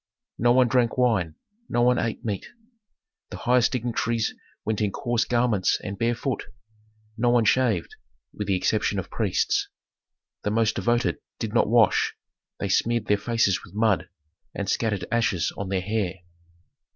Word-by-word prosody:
No 120 +2 +4
one 125 0 +5
drank 120 0 +1
wine, 105 -11 +1 0.3
no 120 - +2
one 125 0 +4
ate 115 -1 -3
meat. 105 -3 -3 0.8
The - - -7
highest 125 0 +3
dignitaries 115 -2 -1 0.3
went 110 0 -1
in 105 -2 +1
coarse 120 +2 0
garments 120 -5 +1
and 100 -1 -4
barefoot. 120 +3 -1 0.7
No 120 +1 +3
one 120 -2 +3
shaved 115 -7 +2 0.4
(with 105 - -5
the 100 - +2
exception 105 +2 0
of 95 - -4
priests); - - 0 0.7
the - - -1
most 110 +1 +2
devoted 120 +1 +1 0.2
did 110 -2 -4
not 115 - +3
wash, 115 -3 +3 0.4
they 100 - -2
smeared 115 +4 +1
their 105 - +2
faces 115 -4 +1
with 90 - -14
mud, 105 -4 +1 0.5
and 100 - -3
scattered 105 -1 0
ashes 115 -8 +1
on 100 -2 -5
their 95 -1 0
hair. 100 -1 -1
115 Hz, 150 wpm, -25 LUFS, 100-120 Hz, 0.8 s, one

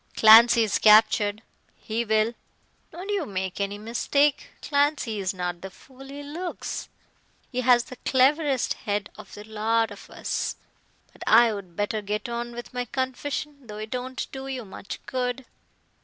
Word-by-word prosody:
"Clancy 230 +1 +8
is 215 - 0
captured 215 0 +5 0.3
he 225 +2 -3
will." 220 +1 +1 0.6
"Don't 360 +5 -8
you 405 -4 0
make 190 0 -4
any 200 +1 -2
mistake. 270 +6 0
Clancy 285 -7 0
is 190 -1 -1
not 180 -2 -4
the 190 - -7
fool 265 +7 -16
he 285 +1 -8
looks. 335 +5 -5 0.6
He 255 -1 -1
has 245 -1 +5
the 255 0 -11
cleverest 270 +1 +2
head 205 -1 -3
of 215 -3 -12
the 210 - -9
lot 220 +1 0
of 205 - -12
us. - - -3 0.6
But - - -21
I'd 210 -6 +4
better 205 +2 -1
get 210 +2 -3
on 240 0 -4
with 240 +1 -9
my 245 0 -2
confession, 270 +2 -4
though 210 -1 -8
it 215 +2 -6
won't 255 +1 -4
do 265 0 -7
you 260 -4 -5
much 195 0 -8
good." 250 0 -3
235 Hz, 155 wpm, -25 LUFS, 210-260 Hz, 0.6 s, Clancy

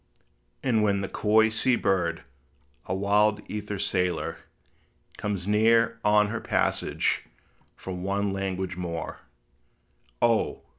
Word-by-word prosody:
And 115 -5 +2
when 100 -2 +2
the 100 - -2
coy 110 +2 +3
sea 120 +3 +2
bird, 85 -6 0 0.6
a 95 - -1
wild 105 +2 +2
ether 105 -1 -4
sailor, 90 -3 -1 0.8
Comes 100 -3 -3
near 115 +2 +3
on 105 0 +4
her 110 +1 -3
passage, - - 0 0.5
for 95 - -7
one 100 +2 -1
language 95 -1 -3
more, 85 -2 -5 1.0
O! 115 -2 +1
100 Hz, 110 wpm, -26 LUFS, 95-110 Hz, 1.0 s, on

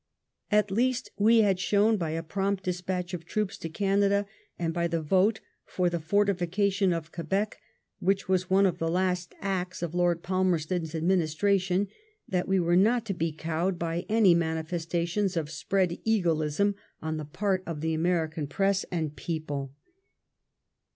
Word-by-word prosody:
At 210 -1 +3
least 250 +4 0
we 225 +2 +6
had 195 -3 +2
shown 210 +3 +3
by 170 -6 -2
a 165 +1 -3
prompt 195 +3 -1
despatch 180 0 -3
of 170 -2 -4
troops 205 +3 -2
to 165 - -5
Canada, 200 +3 +2 0.3
and 165 -1 -1
by 170 0 0
the 165 0 -1
vote 190 +7 +2 0.2
for 180 -1 -1
the 170 - -1
fortification 195 +2 +1
of 165 -1 -3
Quebec, 195 +5 -2 0.4
which 195 +1 0
was 185 -1 +1
one 195 +1 +5
of 180 -2 0
the 165 - 0
last 180 0 -1
acts 185 -3 -2
of 170 -1 -3
Lord 175 -1 +1
Palmerston's 175 -3 0
administration, 185 +3 +1 0.4
that 180 -1 -1
we 190 0 +2
were 175 0 +2
not 225 +5 +3
to 200 - -2
be 165 -2 -1
cowed 165 +4 -2
by 170 +1 -3
any 215 -4 +5
manifestations 170 +3 -1
of 155 -2 -2
spread 185 +3 0
eagleism 175 -3 +1 0.3
on 160 0 -2
the 155 - -4
part 190 +5 -1
of 160 -3 -4
the 160 0 0
American 160 -2 0
press 195 +4 +1
and 160 -4 -3
people. 145 -5 -4
180 Hz, 155 wpm, -28 LUFS, 165-195 Hz, 0.4 s, we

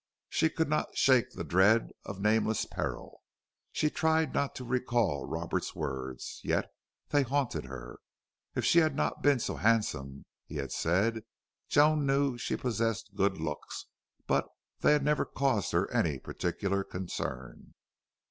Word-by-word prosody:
She 160 - +2
could 160 0 0
not 150 +1 -1
shake 130 -3 +4
the - - -6
dread 95 +8 +4
of 100 -1 -6
nameless 110 +1 +2
peril. - - -5 0.5
She 150 - +1
tried 160 -2 +2
not 140 - 0
to 130 - -6
recall 120 - 0
Roberts's - - -3
words, 65 -3 -5
yet - - 0 0.4
they 145 - +4
haunted 135 0 -1
her. 65 -2 -9 0.6
If - - 0
she 170 - +6
had 155 -4 +2
not - - -1
been 145 -2 +4
so 100 -8 -3
handsome, 75 -9 0 0.2
he - - -9
had - - -3
said! 105 +7 +1 0.5
Joan 150 -1 +4
knew 135 -1 +2
she 120 - -2
possessed 115 -3 -1
good 100 -1 +1
looks, 75 -2 -5 0.4
but - - +1 0.3
they - - +5
had 150 -1 +2
never 150 +1 +2
caused 130 - 0
her - - +2
any 75 -4 +1
particular 95 +7 -2
concern. 70 -10 -6
110 Hz, 150 wpm, -31 LUFS, 85-140 Hz, 0.6 s, she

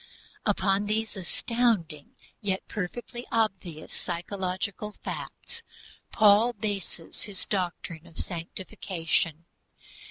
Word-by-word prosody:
Upon 195 0 +4
these 220 +1 +1
astounding 190 -5 +1 0.3
yet 195 -3 0
perfectly 240 +4 -4
obvious 190 -8 0
psychological 190 +3 -2
facts, 465 - -5 0.5
Paul 215 +3 +7
bases 200 -5 -3
his 200 -3 +1
doctrine 175 -3 -2
of 165 - -16
sanctification. 165 -1 -1
195 Hz, 85 wpm, -29 LUFS, 175-215 Hz, 0.5 s, Paul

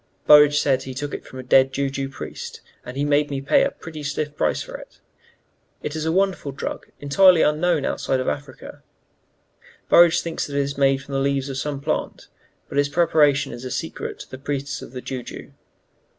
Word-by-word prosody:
Burridge 150 0 +7
says 135 -2 +1
he 130 -1 -7
took 145 +2 -4
it - - -7
from 130 - -11
a 130 - -6
dead 130 +1 +4
Jou 135 0 -1
Jou 135 0 -3
priest, 135 - -8 0.2
and 125 +2 -8
he 145 - 0
made 145 0 +2
me 140 -1 -3
pay 135 - +3
a - - +1
pretty 160 -2 -10
stiff 145 +1 -3
price - - 0
for - - -9
it. - - -12 0.8
It 150 - -4
is 155 0 -3
a 160 - +1
wonderful 190 -5 0
drug, 135 - -6
entirely 175 +4 +5
unknown 155 -1 +1
outside 130 - -1
of 130 - -3
Africa. 145 -2 -6 1.1
Burridge 175 0 +6
thinks 165 -3 -4
it 140 - -6
is 140 0 -1
made 135 0 +2
from 140 - -10
the 135 - +1
leaves 140 0 0
of 135 -1 -4
some 145 0 -3
plant; 155 +2 -3 0.4
but 140 - -1
its 145 0 +2
preparation 145 -3 +3
is 120 +1 -8
a 130 - -5
secret - - -5
of - - -22
the 130 - -8
priests 140 0 -4
of - - -10
Jou 130 -2 -4
Jou. - - -10
140 Hz, 205 wpm, -22 LUFS, 135-150 Hz, 1.1 s, Burridge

